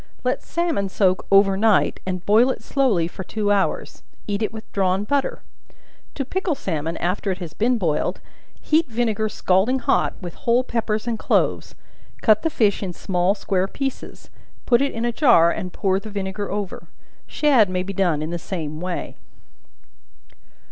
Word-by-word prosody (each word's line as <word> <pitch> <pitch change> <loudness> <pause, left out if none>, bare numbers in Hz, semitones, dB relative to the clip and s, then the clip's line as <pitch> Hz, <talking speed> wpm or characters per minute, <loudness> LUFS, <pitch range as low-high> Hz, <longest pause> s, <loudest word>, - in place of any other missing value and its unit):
Let - - 0
salmon 330 - -1
soak 185 -1 +1
over 195 0 +5
night, 215 +2 +2
and 185 -1 -3
boil 225 +5 +5
it 260 - -3
slowly 235 -12 +1
for 190 - -8
two 205 +2 -1
hours; 200 -1 -1 0.2
eat 205 0 -2
it 215 - 0
with 220 0 -10
drawn 190 0 +1
butter. 280 +5 -1 0.7
To 275 - -2
pickle 370 +2 -1
salmon 165 - -3
after 185 +4 -1
it 185 - -1
has 170 -4 -7
been 240 +6 +1
boiled, 160 -7 -1 0.4
heat 310 +1 +2
vinegar 220 -2 -1
scalding 195 +6 +2
hot, 260 - +1
with 175 -3 -7
whole 240 +2 +1
peppers 220 -3 -2
and 230 -2 -2
cloves; - - 0 0.5
cut 215 -2 +5
the 325 - 0
fish 215 -9 +1
in 185 -3 -4
small 180 +2 0
square 190 -2 -1
pieces; 270 +5 -6 0.3
put 240 0 +4
it 280 - +1
in 230 +1 -3
a 240 - +1
jar, 235 - +5
and 185 -2 -4
pour 190 +1 0
the 215 - -9
vinegar 200 0 -4
over. 200 -4 -5 0.4
Shad 265 -10 +3
may 185 0 -1
be 195 +1 -5
done 175 -6 +1
in 155 - -4
the 175 - -3
same 155 -4 -5
way. 180 -1 -4
205 Hz, 170 wpm, -22 LUFS, 185-235 Hz, 0.7 s, over